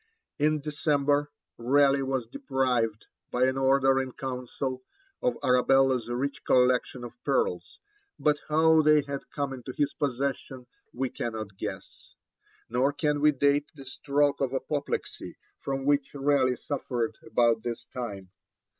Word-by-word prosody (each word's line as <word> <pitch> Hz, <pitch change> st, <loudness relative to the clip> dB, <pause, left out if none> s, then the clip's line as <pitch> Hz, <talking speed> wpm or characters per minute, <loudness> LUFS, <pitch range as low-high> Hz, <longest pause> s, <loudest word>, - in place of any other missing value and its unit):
In 150 Hz, 0 st, +2 dB
December, 145 Hz, -1 st, +1 dB, 0.3 s
Raleigh 140 Hz, +3 st, +3 dB
was 135 Hz, -2 st, -1 dB
deprived, 125 Hz, -, -1 dB, 0.2 s
by 125 Hz, +1 st, +2 dB
an 130 Hz, 0 st, +1 dB
order 135 Hz, 0 st, +3 dB
in 130 Hz, -1 st, -6 dB
Council, 130 Hz, 0 st, -4 dB, 0.4 s
of 250 Hz, -, 0 dB
Arabella's 125 Hz, -1 st, +3 dB
rich 130 Hz, +4 st, -3 dB
collection 125 Hz, 0 st, +2 dB
of 120 Hz, -, -8 dB
pearls, 475 Hz, -1 st, -1 dB, 0.4 s
but 150 Hz, -1 st, +2 dB
how 160 Hz, +1 st, +5 dB
they 150 Hz, -1 st, +5 dB
had 140 Hz, -1 st, -6 dB
come 140 Hz, -2 st, -3 dB
into 130 Hz, 0 st, -7 dB
his 145 Hz, -1 st, +1 dB
possession 135 Hz, -2 st, -3 dB, 0.3 s
we 130 Hz, 0 st, -3 dB
cannot 110 Hz, -4 st, -5 dB
guess. -, -, -8 dB, 0.5 s
Nor 130 Hz, +4 st, +1 dB
can 150 Hz, -1 st, 0 dB
we 150 Hz, 0 st, +6 dB
date 145 Hz, +1 st, +1 dB
the 135 Hz, -2 st, -11 dB
stroke 140 Hz, +2 st, 0 dB
of 135 Hz, -1 st, 0 dB
apoplexy 140 Hz, +2 st, -4 dB, 0.2 s
from 135 Hz, 0 st, -3 dB
which 145 Hz, 0 st, +1 dB
Raleigh 135 Hz, -2 st, +2 dB
suffered 125 Hz, -3 st, -3 dB
about 115 Hz, -2 st, +2 dB
this 120 Hz, 0 st, -5 dB
time. 100 Hz, -7 st, -6 dB
135 Hz, 135 wpm, -28 LUFS, 125-145 Hz, 0.5 s, we